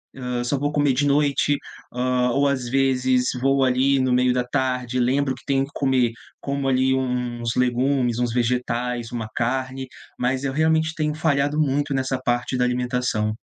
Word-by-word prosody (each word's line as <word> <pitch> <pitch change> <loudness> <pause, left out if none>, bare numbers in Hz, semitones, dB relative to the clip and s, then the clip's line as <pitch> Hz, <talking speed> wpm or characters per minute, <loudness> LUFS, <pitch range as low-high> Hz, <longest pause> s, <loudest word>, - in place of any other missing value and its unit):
Ah, 125 -2 -3
só 140 +3 0
vou 145 +2 -1
comer 145 -2 +2
de 140 +3 +1
noite. 145 0 +2 0.4
Ah, 125 0 +1
ou 140 +2 +2
às 130 -3 -1
vezes 130 -1 +2 0.2
vou 135 +1 +3
ali 130 +2 +3
no 130 -1 +1
meio 125 0 +3
da 125 0 0
tarde, 125 -1 -1
lembro 130 +2 +1
que - - -16
tenho 135 -1 +1
que 140 - -17
comer, 130 -4 +2 0.3
como 140 -1 -3
ali 130 0 +2
uns 125 -2 -2
legumes, 125 0 +1
uns 120 -2 0
vegetais, 120 -1 -1
uma 115 -2 -4
carne, 130 +2 -2 0.3
mas 130 +2 -1
eu 135 - -2
realmente 160 +1 +2
tenho 150 -1 -1
falhado 150 -1 0
muito 145 -1 0
nessa 130 0 -1
parte 120 +1 -1
da 125 - +2
alimentação. 125 -3 -1
130 Hz, 175 wpm, -23 LUFS, 125-140 Hz, 0.4 s, vou